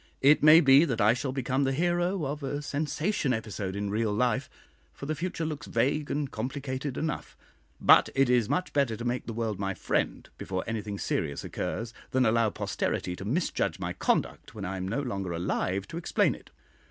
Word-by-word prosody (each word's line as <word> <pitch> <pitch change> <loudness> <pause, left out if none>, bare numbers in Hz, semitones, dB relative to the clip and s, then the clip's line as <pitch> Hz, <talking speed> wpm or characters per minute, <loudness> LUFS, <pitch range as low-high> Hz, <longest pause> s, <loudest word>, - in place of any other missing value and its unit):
It 145 +3 +6
may 155 +2 +8
be 135 0 +7
that 125 -8 -1
I 110 +1 +5
shall 130 +2 -3
become 130 +1 0
the 135 - +1
hero 175 +2 0
of 145 +2 -4
a 145 +1 -3
sensation 150 +1 -1
episode 105 -4 -4
in 100 0 -2
real 110 0 0
life, 115 +2 0 0.5
for - - -8
the 155 - -1
future 165 +1 -3
looks 155 -3 -5
vague 145 +6 0
and 145 -2 -2
complicated 130 +3 -4
enough; 155 -1 -4 0.4
but - - +6
it 135 -1 +4
is 120 -3 +2
much 185 0 -1
better 135 -6 +1
to 115 - -6
make 120 +1 -2
the - - -3
world 110 -3 -2
my 95 -1 -2
friend - - -1
before 95 -1 -3
anything 110 -3 -4
serious 70 -6 -2
occurs, 115 +1 -4 0.2
than 130 -1 +2
allow 115 0 +3
posterity 90 -3 -2
to 95 - -8
misjudge 155 - 0
my - - -3
conduct - - -1
when 100 -3 -5
I 95 +1 -3
am 95 0 -3
no 135 +9 -1
longer 100 -8 -3
alive 90 +3 -1
to 165 - -6
explain 170 - +2
it. - - -14
125 Hz, 195 wpm, -28 LUFS, 105-145 Hz, 0.5 s, may